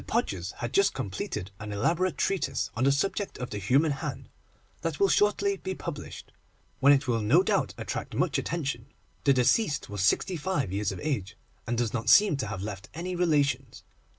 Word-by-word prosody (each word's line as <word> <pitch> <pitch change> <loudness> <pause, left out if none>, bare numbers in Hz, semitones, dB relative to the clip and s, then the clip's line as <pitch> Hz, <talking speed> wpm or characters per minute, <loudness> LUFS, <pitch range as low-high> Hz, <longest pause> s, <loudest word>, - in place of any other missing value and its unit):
Podgers 90 0 -1
had 120 0 -5
just 200 0 +3
completed 100 -4 -4
an 105 -1 -6
elaborate 165 - 0
treatise 195 -6 -1
on 125 +2 +1
the 140 - +5
subject 195 +8 -1
of 125 - -5
the 105 - -3
Human 135 - +3
Hand, 140 -2 -5 0.5
that 165 -3 -3
will 195 - +4
shortly 200 -1 +2
be 190 0 -4
published, 150 -5 -7 0.5
when 140 +1 +6
it 140 0 +3
will 115 -2 +1
no 140 - +4
doubt - - 0
attract - - -5
much - - +1
attention. 140 -8 -3 0.4
The 140 - +6
deceased 140 - +2
was 105 -2 -3
sixty 170 - +2
five 150 - -1
years 100 -1 0
of - - -6
age, 110 -10 -3 0.3
and 120 0 -1
does 120 -2 0
not 115 -3 -1
seem 205 -6 +7
to 135 - -3
have 95 - -5
left 100 -2 -6
any 180 +2 -4
relations. 140 -7 0
140 Hz, 185 wpm, -28 LUFS, 110-170 Hz, 0.5 s, seem